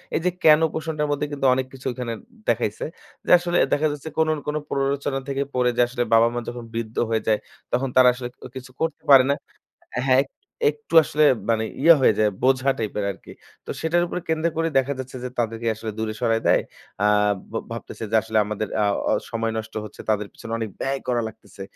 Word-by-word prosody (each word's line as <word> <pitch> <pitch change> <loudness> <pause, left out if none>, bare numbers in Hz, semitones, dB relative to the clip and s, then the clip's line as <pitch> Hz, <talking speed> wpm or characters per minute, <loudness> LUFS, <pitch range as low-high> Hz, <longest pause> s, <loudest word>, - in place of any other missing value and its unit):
এই - - +2
যে - - +5
কেন 155 -1 +7
প্রশ্নটার 155 -1 -2
মধ্যে 145 0 0
কিন্তু 140 -1 -2
অনেক 130 0 0
কিছু 130 -1 -12
ওইখানে 125 -2 -4 0.3
দেখাইছে। 110 -2 0 0.4
যে - - 0
আসলে 175 0 -1 0.2
দেখা 155 +2 +2
যাচ্ছে 145 +2 -6
কোন 160 0 +3
না - - -7
কোন 150 - -1
প্ররোচনা 140 0 -1
থেকে 140 0 0
পড়ে। 125 -1 +2
যে - - +5
আসলে 120 0 -1
বাবা 115 +1 +6
মা 120 - -1
যখন 120 0 -7
বৃদ্ধ 115 -1 -4
হয়ে 110 -1 +1
যায় 110 -1 +3 0.3
তখন 130 +2 0
তারা 130 -1 +7
আসলে 125 -1 -6
ক - - -40 0.2
কিছু 130 0 -8
করতে 160 0 -2
পারে 135 -2 +9
না। - - +4 0.7
হ্যাঁ, 130 0 +5
এক - - -19 0.4
একটু 445 0 -9
আসলে 150 +1 +1 0.3
মানে 110 -1 +2 0.2
ইয়ে 165 +3 +8
হয়ে 120 - +5
যায় 105 -1 +4
বোঝা 130 +1 +3
টাইপের 105 -2 -2
আরকি। 95 - -13 0.3
তো - - -13
সেটার 170 +2 +2
উপরে 180 - -4
কেন্দ্র 160 0 +1
করে 165 0 +1
দেখা 135 +1 +2
যাচ্ছে 130 0 -6
যে 125 - -3
তাদেরকে 115 0 -2
আসলে 110 +1 -5
দূরে 110 -1 -2
সরায় 115 -2 +2
দেয়। - - +4 0.4
আ - - +5 0.4
ভ - - -16 0.2
ভাবতেছে 115 0 -7
যে - - +2
আসলে 110 0 -2
আমাদের 105 +1 -3 0.2
আ - - +3 0.2
অ - - +3 0.2
সময় 115 0 -1
নষ্ট 110 0 -6
হচ্ছে। 105 - -10
তাদের 105 -1 +1
পিছনে 115 - -9
অনেক 115 -1 -3
ব্যয় 135 0 -1
করা 120 -1 +1
লাগতেছে। 105 -2 -13
125 Hz, 210 wpm, -23 LUFS, 115-145 Hz, 0.7 s, পারে